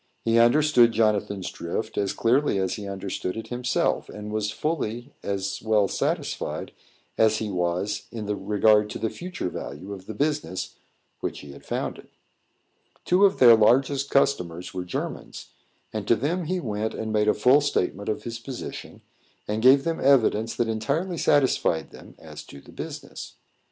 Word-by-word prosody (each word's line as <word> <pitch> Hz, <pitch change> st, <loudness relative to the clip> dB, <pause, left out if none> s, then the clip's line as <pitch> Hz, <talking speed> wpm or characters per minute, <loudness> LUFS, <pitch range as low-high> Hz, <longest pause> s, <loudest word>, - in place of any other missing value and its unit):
He 115 Hz, 0 st, +4 dB
understood 120 Hz, -1 st, +5 dB
Jonathan's 105 Hz, -3 st, 0 dB
drift 110 Hz, +6 st, -4 dB
as 100 Hz, -1 st, 0 dB
clearly 125 Hz, 0 st, +2 dB
as 95 Hz, -1 st, 0 dB
he 105 Hz, -1 st, -6 dB
understood 95 Hz, 0 st, -4 dB
it 110 Hz, 0 st, -7 dB
himself, 125 Hz, -1 st, 0 dB
and 105 Hz, 0 st, -7 dB
was 105 Hz, -1 st, -1 dB
fully 120 Hz, 0 st, -3 dB
as 100 Hz, 0 st, -3 dB
well 110 Hz, -2 st, +2 dB
satisfied -, -, -2 dB, 0.5 s
as 110 Hz, -1 st, +4 dB
he 105 Hz, -2 st, -3 dB
was 90 Hz, +3 st, -2 dB
in 110 Hz, -3 st, -5 dB, 0.2 s
regard 105 Hz, 0 st, +4 dB
to -, -, -5 dB
the 110 Hz, -, -2 dB
future 180 Hz, -, -5 dB
value 90 Hz, +7 st, -7 dB
of 95 Hz, -1 st, -11 dB
the 110 Hz, -, -6 dB
business 145 Hz, -8 st, -2 dB, 0.5 s
which -, -, -4 dB
he 70 Hz, -, -11 dB
had 70 Hz, -, -13 dB
founded. -, -, -4 dB, 1.0 s
Two 185 Hz, +3 st, +5 dB
of 195 Hz, 0 st, +3 dB
their 120 Hz, -3 st, +8 dB
largest 135 Hz, +5 st, +3 dB
customers 90 Hz, -12 st, 0 dB
were 90 Hz, -1 st, -4 dB
Germans, 90 Hz, -, -6 dB, 0.4 s
and 105 Hz, -2 st, -4 dB
to 115 Hz, -, +5 dB
them 160 Hz, +10 st, -1 dB
he 185 Hz, +3 st, -1 dB
went 110 Hz, -6 st, -3 dB
and 110 Hz, -1 st, -4 dB
made 105 Hz, 0 st, +2 dB
a -, -, +4 dB
full 125 Hz, +7 st, +5 dB
statement 100 Hz, -8 st, -1 dB
of 110 Hz, -, -2 dB
his 115 Hz, -1 st, -5 dB
position, 130 Hz, +1 st, -8 dB, 0.4 s
and 105 Hz, +1 st, -2 dB
gave 135 Hz, +3 st, +6 dB
them 165 Hz, +1 st, -2 dB
evidence 115 Hz, -5 st, +3 dB
that 120 Hz, -, 0 dB
entirely 145 Hz, -, -1 dB
satisfied 130 Hz, -, +2 dB
them -, -, -14 dB
as -, -, -10 dB
to 70 Hz, -, -12 dB
the -, -, -16 dB
business. -, -, -8 dB
110 Hz, 165 wpm, -25 LUFS, 100-135 Hz, 1.0 s, their